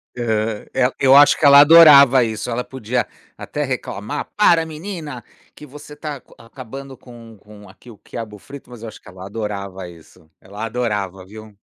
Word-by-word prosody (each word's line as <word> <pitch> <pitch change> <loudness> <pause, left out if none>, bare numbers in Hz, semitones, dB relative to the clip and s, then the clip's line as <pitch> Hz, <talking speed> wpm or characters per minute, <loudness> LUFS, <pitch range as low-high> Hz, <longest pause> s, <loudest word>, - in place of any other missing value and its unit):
Aham, 110 -3 -3
é 125 -1 +1
eu 135 0 +4
acho 145 +1 +6
que 155 - -1
ela 140 0 +8
adorava 145 -5 +7
isso, 110 +1 -5
ela 120 +1 -3
podia 125 -2 -4 0.3
até 150 - -5
reclamar 130 -1 -5
“para 170 -6 +3
menina, 160 -5 -8 0.3
que 150 - -13
você 150 +1 -13
está 150 0 -7
aca - - -22
acabando 130 +3 -11
com 115 -3 -15
com 105 0 -16
aqui 120 - -18
o 105 - -16
quiabo 105 0 -9
frito” 140 +3 -13
mas 120 -2 -13
eu 115 - -8
acho 110 - -12
que 95 - -16
ela 95 0 -12
adorava 100 -3 -7
isso, 80 -1 -19
ela 105 +3 -8
adorava, 105 -5 -4
viu. 110 +1 -14
120 Hz, 180 wpm, -19 LUFS, 105-140 Hz, 0.3 s, ela